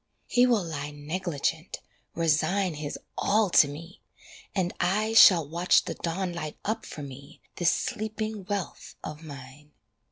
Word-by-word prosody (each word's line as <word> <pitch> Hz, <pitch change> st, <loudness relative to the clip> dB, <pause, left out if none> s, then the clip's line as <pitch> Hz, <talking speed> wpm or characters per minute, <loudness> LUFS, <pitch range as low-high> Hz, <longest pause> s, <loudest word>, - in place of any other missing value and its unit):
He 245 Hz, +1 st, +4 dB
will 230 Hz, -6 st, +3 dB
lie 150 Hz, -3 st, -4 dB
negligent, 160 Hz, +2 st, -3 dB, 0.4 s
resign 170 Hz, +3 st, +1 dB
His 150 Hz, -1 st, -5 dB, 0.2 s
all 210 Hz, -2 st, +2 dB
to 150 Hz, -, +7 dB
me, 165 Hz, +5 st, -10 dB, 0.5 s
and 185 Hz, -2 st, 0 dB
I 210 Hz, +5 st, +1 dB
Shall 180 Hz, -8 st, +8 dB
watch 170 Hz, +4 st, +3 dB
the -, -, -3 dB
dawn 175 Hz, +2 st, -3 dB
light 155 Hz, -3 st, -5 dB
up 220 Hz, +2 st, -2 dB
for 150 Hz, -, -7 dB
me 140 Hz, +2 st, -11 dB, 0.2 s
This 175 Hz, -2 st, +3 dB
sleeping 220 Hz, -3 st, -3 dB
wealth 200 Hz, -1 st, -5 dB
of 150 Hz, 0 st, -7 dB
mine. 145 Hz, 0 st, -11 dB
170 Hz, 140 wpm, -27 LUFS, 150-200 Hz, 0.5 s, Shall